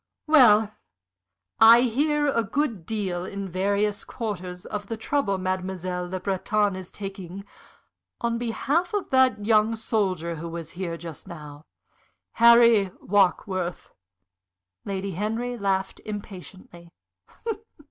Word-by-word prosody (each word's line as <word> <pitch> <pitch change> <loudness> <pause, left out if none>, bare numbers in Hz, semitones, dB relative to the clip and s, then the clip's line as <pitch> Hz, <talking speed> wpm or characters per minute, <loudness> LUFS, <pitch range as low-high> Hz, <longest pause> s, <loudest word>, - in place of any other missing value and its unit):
"Well, 225 -9 +6 0.9
I 230 +2 +9
hear 295 +5 +1
a 250 -5 +1
good 225 - -2
deal 190 -5 -2
in 195 +1 -5
various 200 +3 0
quarters 180 -6 -6
of 205 -1 -5
the 225 - -4
trouble 220 -4 0
Mademoiselle 185 -1 -3
Le 185 +1 -3
Breton 200 +1 0
is 185 -1 -8
taking 195 -1 -8 0.7
on 235 0 -1
behalf 290 - -1
of 405 - -3
that 260 -5 +3
young 220 0 +3
soldier 185 -7 -1
who 165 +2 -6
was 165 -1 -7
here 175 -2 -4
just 165 +1 -9
now 150 -3 -10 0.7
Harry 235 -4 +7
Warkworth." 185 -2 0 0.9
Lady 195 0 -3
Henry 225 +6 -2
laughed 195 -3 -1
impatiently. 185 -4 -9
200 Hz, 115 wpm, -25 LUFS, 185-225 Hz, 0.9 s, I